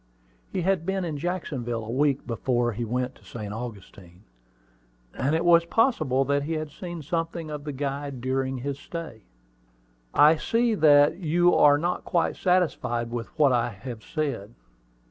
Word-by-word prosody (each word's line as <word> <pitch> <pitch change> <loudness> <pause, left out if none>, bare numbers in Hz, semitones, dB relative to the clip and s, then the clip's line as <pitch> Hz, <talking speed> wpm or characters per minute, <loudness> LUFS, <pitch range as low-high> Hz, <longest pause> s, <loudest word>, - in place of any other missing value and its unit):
He 180 - -2
had 190 -2 +1
been 190 +1 -1
in 155 -4 -4
Jacksonville 130 -10 -3
a 110 - -5
week 140 +1 +1
before 120 +1 0
he 115 +2 -4
went 125 +3 -2
to - - -22
St. 105 -3 -7
Augustine; 100 -5 -9 0.9
and 140 +4 0
it 165 +2 0
was 170 -1 +6
possible 170 - +2
that 140 +1 +1
he 155 +3 -3
had 155 -1 -4
seen 175 -1 -7
something 165 +1 -3
of 150 -1 -6
the 150 - -3
guide 140 -1 -4
during 130 +1 -1
his 140 +2 -4
stay. 160 - -8 0.9
"I 155 - +6
see 230 +6 +1
that 145 -6 +5
you 175 0 +3
are 145 -1 +6
not 175 +4 -2
quite 175 - 0
satisfied 145 -10 0
with 120 -1 -4
what 145 -4 +5
I 120 0 +1
have 110 +2 -8
said. 135 - -4
145 Hz, 165 wpm, -26 LUFS, 120-165 Hz, 0.9 s, was